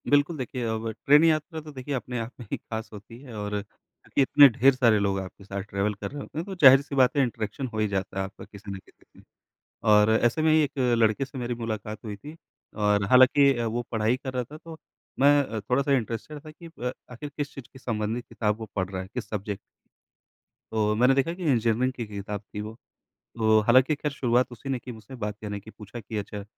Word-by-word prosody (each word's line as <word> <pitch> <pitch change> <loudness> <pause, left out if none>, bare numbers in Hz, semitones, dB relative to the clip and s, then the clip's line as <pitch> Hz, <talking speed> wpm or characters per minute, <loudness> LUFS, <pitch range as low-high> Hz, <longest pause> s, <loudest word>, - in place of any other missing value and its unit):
बिल्कुल। 145 +3 +3
देखिए 125 -1 -4
अब 110 0 -2 0.2
ट्रेन 145 +3 +7
यात्रा 160 0 +1
तो 155 0 -10
देखिए 140 +1 -6
अपने 125 -1 -4
आप 115 +1 -5
में 120 - -8
ही - - -1
ख़ास 110 0 -6
होती 115 +3 -11
है 125 -5 -10
और 105 0 -2
क्योंकि 105 +6 -5
इतने 140 +1 +8
ढेर 130 +4 +4
सारे 115 -4 +4
लोग 100 -1 0
आपके 95 +1 -9
साथ 100 0 -5
ट्रैवल 100 +2 0
कर 100 - -6
रहे 145 0 -6
होते - - -10
हैं 165 - -3
तो 195 - -6
ज़ाहिर 135 0 +10
सी 140 0 -7
बात 130 +2 +4
है 140 - +5
इंटरेक्शन 115 +1 -3
हो 110 - -2
ही 110 - +2
जाता 95 -1 -3
है - - 0
आपका 95 0 -9
किसी 100 0 -10
ना 95 - -5
किसी - - -24
से। - - -18 0.7
और 105 0 +6
ऐसे 120 +6 +2
में 155 0 +4
ही 155 0 +5
1 145 - -4 0.2
लड़के 110 +4 +2
से 135 0 -11
मेरी 120 -1 -3
मुलाकात 110 -2 -5
हुई 105 -2 -5
थी। 150 +10 -11 0.4
और 105 -1 +2
हालाँकि 130 +2 +6
वो 115 +1 -1
पढ़ाई 110 +2 +1
कर 130 -1 -6
रहा 125 -1 -1
था 150 +6 -11
तो 165 0 -11 0.4
मैं 140 -5 +4
थोड़ा-सा 130 +6 0
इंटरेस्टेड 120 +6 -5
था 155 - -9
कि 170 +2 -13 0.2
अ, 125 - 0 0.2
आखिर 135 +5 -7
किस 145 -1 -3
चीज़ 135 - -9
के 130 - -13
संबंधित 115 0 -3
किताब 105 -1 -1
वो 110 - -5
पढ़ 95 -2 -1
रहा 95 -1 -4
है, 95 - -8
किस 125 - -5
सब्जेक्ट 100 -1 -4 1.1
तो 105 -1 +1
मैंने 125 +4 +5
देखा 140 +5 +1
कि 180 +1 -8
इंजीनियरिंग 120 +1 +2
की 120 -2 -5
किताब 100 0 -5
थी 105 0 -8
वो। 110 +1 -6 0.7
तो 110 -1 +4
हालाँकि 130 +6 +4
ख़ैर 150 0 -3
शुरुआत 125 -2 +1
उसी 130 +3 -9
ने 135 -2 0
की 125 +1 -9
मुझसे 110 +3 -12
बात 105 0 -2
कहने 105 -1 -4
की। 110 - -13
पूछा 110 +2 -10
कि 110 0 -7
अच्छा 100 0 -6
120 Hz, 230 wpm, -26 LUFS, 105-135 Hz, 1.1 s, ज़ाहिर